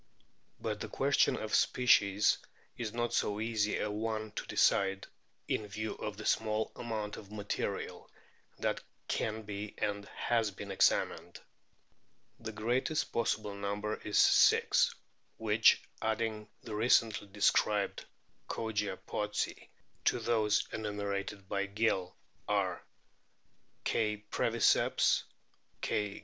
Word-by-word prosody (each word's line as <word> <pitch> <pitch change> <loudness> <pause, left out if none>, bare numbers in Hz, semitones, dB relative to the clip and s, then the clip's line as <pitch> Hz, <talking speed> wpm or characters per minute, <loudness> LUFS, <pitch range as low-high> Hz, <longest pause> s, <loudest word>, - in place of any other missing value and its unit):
But - - -3
the - - -4
question - - +2
of - - -5
species 105 -5 +4 0.4
is 115 -3 -4
not 120 +1 -2
so 105 0 +1
easy 110 -2 0
a 105 - -1
one 110 0 -3
to - - -6
decide, 95 0 +2 0.4
in 105 - -1
view 110 +2 -4
of - - -6
the - - -7
small 110 0 +1
amount 110 -3 -4
of 100 -1 -11
material 105 -1 -4 0.5
that - - -1 0.3
can 110 0 -2
be 105 0 -6
and 100 -1 -2
has 115 0 0
been 100 0 -8
examined. 95 - +1 1.0
The 110 - -5
greatest 120 +8 0
possible 110 -3 -1
number 100 +1 -2
is 105 - -2
six, - - +5 0.4
which - - +4 0.2
adding 110 -1 -1 0.2
the 110 - -7
recently 110 -1 +3
described 105 0 +2 0.5
Kogia 105 -4 -2
pottsi 105 0 -3 0.4
to - - +3
those 110 -3 +1
enumerated 100 -2 -3
by 100 0 -1
Gill 100 -3 0 0.3
are 95 -3 0 1.0
K. 105 -1 0
breviceps, - - +3 0.6
K. 105 -1 -1
105 Hz, 115 wpm, -32 LUFS, 100-110 Hz, 1.0 s, six